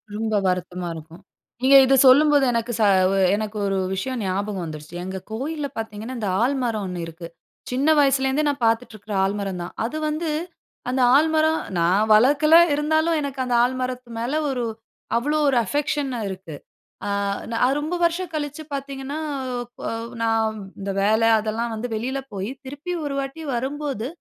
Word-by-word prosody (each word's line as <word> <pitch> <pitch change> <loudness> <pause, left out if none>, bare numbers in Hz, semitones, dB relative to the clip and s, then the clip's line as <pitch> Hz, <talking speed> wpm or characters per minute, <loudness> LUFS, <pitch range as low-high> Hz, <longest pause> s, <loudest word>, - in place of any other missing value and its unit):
ரொம்ப 220 0 -2
வருத்தமா 180 -1 -2
இருக்கும். 160 +2 -11 0.4
நீங்க 270 +2 +6
இது 270 +1 +4
சொல்லும்போது 285 +1 +6
எனக்கு 230 0 -1
ச - - +3 0.5
எனக்கு 215 0 -4
ஒரு 195 -1 0 0.2
விஷயம் 245 +5 -3
ஞாபகம் 195 0 -2
வந்துடுச்சு. 155 +1 -8
எங்க 190 +1 -5
கோயில்ல 285 +5 -3
பாத்தீங்கன்னா, 220 +2 -5
இந்த 210 -3 -2
ஆலமரம் 245 -6 0
1 180 -2 -4
இருக்கு. 165 +1 -9 0.4
சின்ன 265 +4 0
வயசுலருந்தே 270 +1 +2
நான் 280 -3 -3
பாத்துட்ருக்கிற 225 -2 -1
ஆலமரம் 195 -2 -2
தான். 175 - -8
அது 295 +7 -4
வந்து 310 +2 -2 0.6
அந்த 255 +1 0
ஆலமரம், 315 +1 +3 0.2
நான் 185 +6 +3
வளக்கல 285 +8 +5 0.2
இருந்தாலும் 315 +2 +1
எனக்கு 280 -2 -5
அந்த 245 -1 0
ஆலமரத்து 255 0 -2
மேல 240 +4 -2 0.2
ஒரு, 250 -2 -2 0.5
அவ்வளோ 295 +6 0
ஒரு 260 - +2
அஃபெக்க்ஷன்னா 285 +1 -1
இருக்கு. 185 -5 -7 0.5
அ - - -1 0.4
நான் 250 +4 +2
ரொம்ப 310 +4 -2
வருஷம் 345 +1 -1
கழிச்சு 295 0 -4
பாததீங்கன்னா, 275 +1 -5 0.6
பொவ் 230 +1 -4
நா 230 - +2 0.5
இந்த 200 0 -3
வேல 215 +3 +3 0.2
அதெல்லாம் 225 +2 -2
வந்து 225 +3 -4
வெளில 255 +5 -2 0.2
போயி, 195 +2 -3 0.2
திருப்பி 285 +6 -6
ஒரு 285 - -3
வாட்டி 275 +4 -5
வரும்போது, 270 -2 -3
250 Hz, 150 wpm, -23 LUFS, 210-285 Hz, 0.6 s, நீங்க